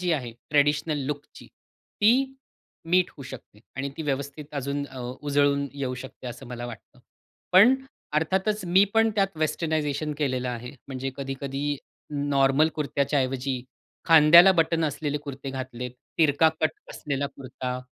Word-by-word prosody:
जी 180 -1 0
आहे 125 -6 -2 0.2
ट्रेडिशनल 145 +1 +2
लूकची, 145 0 -6
ती 265 +5 0 0.6
मीट 180 0 +4
होऊ 140 - -9
शकते 120 -5 -11 0.2
आणि 135 +1 -2
ती 160 - -4
व्यवस्थित 140 0 -3
अजून 140 +1 -2
अ, 130 -2 -11 0.2
उजळून 145 -1 +2
येऊ 135 -2 -3
शकते 130 -1 -11
असं 125 +2 -7
मला 120 0 -6
वाटतं, 120 -2 -11 0.5
पण 210 +8 +8 0.4
अर्थातच 190 +7 0
मी 185 +3 +5
पण 225 0 +4
त्यात 195 -3 +1
वेस्टर्नायझेशन 155 -1 -1
केलेलं 130 -3 -1
आहे, 125 0 -5 0.2
म्हणजे 135 0 -4
कधी-कधी 140 +1 -3 0.4
नॉर्मल 140 +1 +3
कुर्त्याच्या 140 -1 0
ऐवजी 130 -1 -2 0.5
खांद्याला 165 +4 +9
बटन 165 -2 +2
असलेले 150 0 -2
कुर्ते 140 -1 -7
घातलेत, 130 -2 -5 0.3
तिरका 160 0 +5
कट 155 - +3 0.2
असलेला 140 -1 -3
कुर्ता 130 -2 -6
145 Hz, 135 wpm, -26 LUFS, 135-160 Hz, 0.6 s, खांद्याला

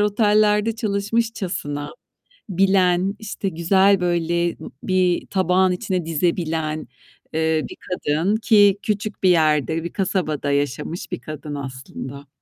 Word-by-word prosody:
otellerde 210 +1 +3
çalışmışçasına 200 -8 -2 0.6
bilen, 190 0 +2
işte, 205 -2 -4
güzel 190 +4 +3
böyle, 170 -1 0
ııı, - - -7
bir 185 -2 +1
tabağın 185 -1 +2
içine 180 -2 -2
dizebilen, 160 -1 -1 0.5
eee, 160 0 +1
bir - - -9
kadın 180 +3 0
ki 205 -3 +4
küçük 210 -1 -3
bir 185 - +5
yerde, 160 -1 +2
bir 170 - -6
kasabada 175 -7 -1
yaşamış 145 +5 -2
bir 180 - -3
kadın 150 -1 -7
aslında. 135 +1 -7
180 Hz, 115 wpm, -22 LUFS, 155-200 Hz, 0.6 s, bir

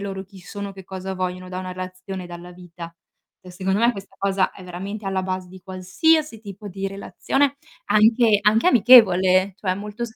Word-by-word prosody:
loro 195 -1 -5
chi 190 0 -16
sono, 200 +2 -7
che 190 0 -11
cosa 190 +1 -6
vogliono 185 0 -4
da 185 0 -5
una 185 - -6
relazione, 185 0 -7
dalla 175 0 -10
vita. 175 -1 -11 0.5
Cioè 180 - -13
secondo 190 +2 -1
me 235 +1 +3
questa 195 -1 -11
cosa 195 -1 +1
è 190 - -13
veramente 195 +4 -7
alla 190 -1 -1
base 185 -1 -4
di 185 +1 -13
qualsiasi 225 - 0
tipo 205 -1 -10
di 195 0 -4
relazione, 270 +8 -1 0.3
anche 215 +1 +4
anche 215 +7 +3
amichevole, 195 - +6
cioè 185 -2 -2
molto 210 +4 -7
190 Hz, 175 wpm, -22 LUFS, 185-210 Hz, 0.5 s, amichevole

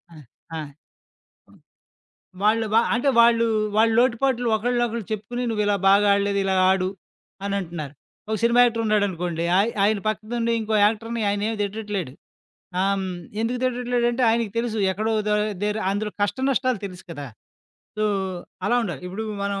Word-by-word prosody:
ఆ! - - -13 0.4
ఆ! - - -3 1.8
ఒ - - -15
వాళ్ళు 220 +2 +3
వ - - +4 0.2
అంటే 245 +4 +1
వాళ్ళు 230 0 +5 0.3
వాళ్ళ 225 +1 +5
లోటుపాట్లు 245 0 +2
ఒకళ్ళనొకళ్ళు 235 -1 -1
చెప్పుకొని, 215 +4 -4
నువ్విలా 210 -2 +1
బాగా 200 +1 +5
ఆడలేదు. 200 0 +1
ఇలా 190 0 +1 0.2
ఆడు 185 -1 +1 0.6
అనంటున్నారు. 175 -8 -4 0.4
ఒక 220 - +1
సినిమా 235 +1 +4
యాక్టర్ 230 -1 +1
ఉన్నాడనుకోండి. 180 -5 0
ఆయ్ 210 +4 +2
ఆయన 210 0 +2
పక్కనుండి 230 +2 -1
ఇంకో 220 0 -2
యాక్టర్‌ని 225 +2 -2
ఆయనేమి 210 +2 -1
తిట్టట్లేడు. 200 -8 -4 0.7
ఆహ్, 195 +1 +2
హ్మ్. 190 - -3 0.3
ఎందుకు 235 +2 -1
తిట్టట్లేడంటే 245 0 0
ఆయనకి 225 -2 0
తెలుసు. 230 -1 -1
ఎక్కడో 215 +4 -1 0.2
దర్ 210 0 +2 0.2
దగ్గర 210 +1 0
అందులో 210 +1 -2
కష్ట 205 +5 0
నష్టాలు 255 -4 +1
తెలుసు 185 -2 -9
కదా! 145 -3 -6 0.7
సో, 215 - +1 0.6
అలా 240 +5 +2
ఉండాలి. 195 -6 -4
ఇప్పుడు 190 +5 -5 0.2
మనం 200 0 -2
215 Hz, 145 wpm, -23 LUFS, 200-235 Hz, 1.8 s, వాళ్ళు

